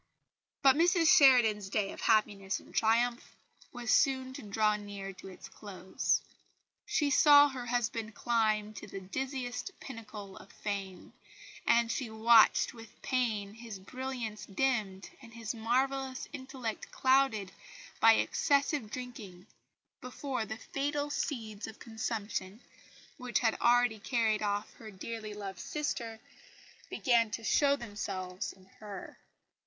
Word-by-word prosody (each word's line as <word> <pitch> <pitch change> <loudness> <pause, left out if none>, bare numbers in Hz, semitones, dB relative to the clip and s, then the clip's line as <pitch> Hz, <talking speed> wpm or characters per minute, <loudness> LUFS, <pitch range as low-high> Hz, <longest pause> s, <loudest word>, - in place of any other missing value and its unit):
But 270 -1 +7
Mrs 335 0 +5
Sheridan's 225 -8 +5
day 195 -1 0
of - - -9
happiness 205 -3 +1
and - - -17
triumph 235 +2 +1 0.4
was 240 -2 -3
soon 260 -1 +2
to - - -8
draw 210 0 +1
near 200 -2 -7
to 190 - -12
its 185 - -10
close. 190 -2 -2 0.6
She 290 -2 +1
saw 290 +1 +7
her 255 -3 -6
husband 230 -2 -2
climb 215 -3 +1
to - - -9
the 195 - -7
dizziest 250 - -4
pinnacle 210 -6 -9
of 195 - -14
fame, 195 -3 -5 0.5
and 235 0 +4
she 255 -5 -3
watched 225 +3 +5
with 225 -2 -14
pain 220 -6 -1
his 225 -2 -8
brilliance 240 +1 -6
dimmed, 205 -4 -1
and 230 0 -14
his 230 -1 -4
marvellous 260 +3 -1
intellect 260 -5 -6
clouded 260 -7 +2 0.5
by - - +8
excessive 280 -5 +1
drinking, 210 -8 -8 0.6
before 255 -1 -4
the 220 - -5
fatal 290 +3 -2
seeds 225 -8 -3
of 220 - -10
consumption, 220 -3 -4 0.6
which 250 -5 -1
had 225 -2 +2
already 240 -2 +4
carried 220 -1 +1
off 205 0 -2
her 220 - -10
dearly 215 +2 -7
loved 195 -3 -7
sister, 235 -7 -3 0.7
began 235 -5 +2
to 225 +2 -5
show 280 +5 +3
themselves 190 -6 -5
in 190 -1 -19
her. 205 -3 -8
225 Hz, 130 wpm, -31 LUFS, 210-255 Hz, 0.7 s, by